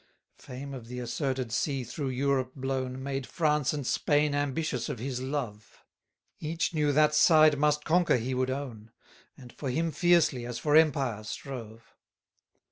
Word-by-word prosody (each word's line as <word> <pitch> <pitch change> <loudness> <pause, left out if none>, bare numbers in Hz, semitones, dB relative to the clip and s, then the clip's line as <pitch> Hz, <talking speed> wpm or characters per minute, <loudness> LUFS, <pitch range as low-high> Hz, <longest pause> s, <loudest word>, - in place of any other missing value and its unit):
22 - - -14
Fame 140 0 -7
of 125 -4 -8
the 125 +1 -7
asserted 130 0 -2
sea 135 +2 -1
through 135 +3 -4
Europe 130 0 0
blown, 130 -1 -3
Made 135 -1 -3
France 150 -4 +1
and 145 -3 -4
Spain 145 +3 +1
ambitious 145 -2 -1
of 145 - -3
his 125 +2 -4
love; 125 -7 -5 0.6
Each 165 +2 -2
knew 150 -2 +2
that 150 +1 +4
side 155 -1 +6
must 150 0 +2
conquer 170 -3 +3
he 125 +3 -3
would 130 0 0
own; 125 -5 -5 0.5
And 125 -3 -13
for 140 - -5
him 165 +5 0
fiercely, 170 -8 +3
as 120 -1 -5
for 150 +3 +1
empire, 135 -8 +3
strove. 115 -1 -8
135 Hz, 160 wpm, -29 LUFS, 125-150 Hz, 0.6 s, side